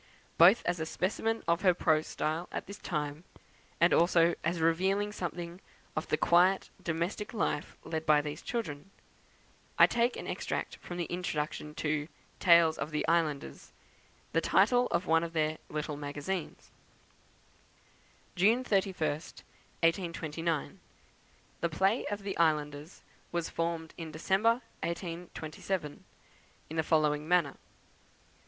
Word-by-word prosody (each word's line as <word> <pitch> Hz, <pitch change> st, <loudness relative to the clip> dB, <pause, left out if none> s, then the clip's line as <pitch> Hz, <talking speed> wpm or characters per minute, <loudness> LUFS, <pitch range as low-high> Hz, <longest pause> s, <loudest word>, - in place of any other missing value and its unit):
Both 185 Hz, +7 st, +7 dB
as 175 Hz, -1 st, 0 dB
a 160 Hz, -, -1 dB
specimen 225 Hz, +6 st, -1 dB
of 170 Hz, +2 st, +2 dB
her 185 Hz, -3 st, +4 dB
prose 155 Hz, -2 st, +2 dB
style 160 Hz, +3 st, -2 dB
at -, -, -4 dB
this 200 Hz, +1 st, -9 dB
time, 150 Hz, -1 st, -3 dB, 0.6 s
and 170 Hz, -, +5 dB
also 170 Hz, 0 st, +4 dB
as 170 Hz, +1 st, 0 dB
revealing 190 Hz, +6 st, +2 dB
something 175 Hz, -1 st, -5 dB, 0.3 s
of 155 Hz, -, -2 dB
the 155 Hz, -, +1 dB
quiet 180 Hz, +4 st, +3 dB
domestic 170 Hz, +7 st, -3 dB
life 155 Hz, -7 st, -2 dB
led 160 Hz, -1 st, -4 dB
by 150 Hz, -1 st, +6 dB
these 150 Hz, 0 st, -5 dB
children, 195 Hz, -8 st, -4 dB, 0.9 s
I -, -, +9 dB
take 240 Hz, +1 st, +1 dB
an -, -, -6 dB
extract -, -, -3 dB
from 175 Hz, -, -8 dB
the 175 Hz, -, -1 dB
introduction 150 Hz, -4 st, -3 dB
to 150 Hz, -1 st, -1 dB, 0.3 s
"Tales 170 Hz, -2 st, +5 dB
of -, -, -3 dB
the 155 Hz, -1 st, -2 dB
Islanders," 160 Hz, -4 st, -1 dB, 0.6 s
the -, -, +2 dB
title 245 Hz, 0 st, +4 dB
of 170 Hz, -, -1 dB
one 165 Hz, 0 st, +3 dB
of 170 Hz, 0 st, -5 dB
their 155 Hz, -1 st, 0 dB
"Little 150 Hz, -1 st, -3 dB
Magazines:" 145 Hz, +5 st, -5 dB, 1.6 s
"June 220 Hz, +8 st, +4 dB
the 220 Hz, -, 0 dB
31st, 160 Hz, -6 st, -3 dB, 0.4 s
1829. 165 Hz, -2 st, -1 dB, 0.8 s
"The 170 Hz, -, 0 dB
play 190 Hz, +8 st, +1 dB
of 205 Hz, -1 st, -4 dB
the 195 Hz, -1 st, -3 dB
'Islanders' 150 Hz, 0 st, 0 dB, 0.3 s
was 170 Hz, -1 st, -2 dB
formed 165 Hz, -1 st, -2 dB
in 160 Hz, -1 st, -6 dB
December, 210 Hz, +9 st, +2 dB, 0.2 s
1827, 170 Hz, -1 st, -4 dB, 0.7 s
in -, -, -5 dB
the -, -, +4 dB
following 155 Hz, -1 st, +1 dB
manner. 170 Hz, -5 st, +2 dB
170 Hz, 135 wpm, -31 LUFS, 155-185 Hz, 1.6 s, I